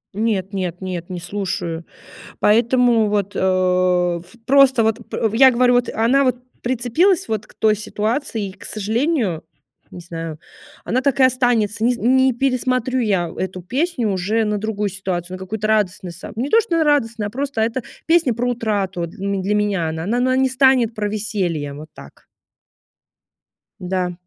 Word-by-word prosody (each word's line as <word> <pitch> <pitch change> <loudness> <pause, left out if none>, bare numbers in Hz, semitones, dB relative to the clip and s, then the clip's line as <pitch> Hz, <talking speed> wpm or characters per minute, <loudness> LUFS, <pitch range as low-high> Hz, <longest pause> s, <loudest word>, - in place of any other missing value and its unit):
Нет 205 -3 -1
нет 180 -3 -3
нет, 180 -1 -5
не 180 -1 -5
слушаю, 175 -4 -4 0.5
поэтому 230 0 +3
вот, 205 -1 -1
э, - - -1
ф 180 -1 +1
просто 265 -3 +5
вот 225 +2 -1
п 220 - -1
я 265 0 +8
говорю 245 0 +3
вот, 245 0 +2
она 250 +5 +3
вот 255 -1 +1 0.3
прицепилась 260 - +1
вот 215 -2 -2
к - - -20
той 215 -1 +2
ситуации, 215 0 -2
и, - - -11
к - - -13
сожалению, 220 - -1 0.5
не 180 - -9
знаю, 165 -2 -7 0.4
она 255 +3 0
так 275 0 0
и - - +6
останется. 240 -4 +2
Нез 245 0 +2
не 260 +2 +3
пересмотрю 255 0 0
я 190 -7 0
эту 185 -1 -4
песню 255 - -1
уже 205 +4 0
на 210 0 0
другую 210 -1 -2
ситуацию, 185 -2 -4
на - - -7
какую-то 210 +3 -3
радостную 190 -4 0
сам 175 +5 -10
Не 255 +6 -2
то, 455 - +5
что 420 -6 -1
на 320 - +3
радостную, 230 -8 +1
а - - -6
просто 270 0 -3
эта 230 +3 -1 0.2
песня 325 -7 +3
про 245 +2 -1
утрату 200 -7 -1
для 180 +4 -10
м 195 -2 -1
для 205 - 0
меня 205 -5 0
она. 160 0 -4
Она 235 +4 0
она 255 +1 +2
не 265 0 +3
станет 260 -3 +3
про 210 -1 -1
веселье. 190 -8 -2
Вот 155 +2 -10
так. - - -15 1.5
Да. 180 -1 -2
215 Hz, 175 wpm, -20 LUFS, 185-250 Hz, 1.5 s, я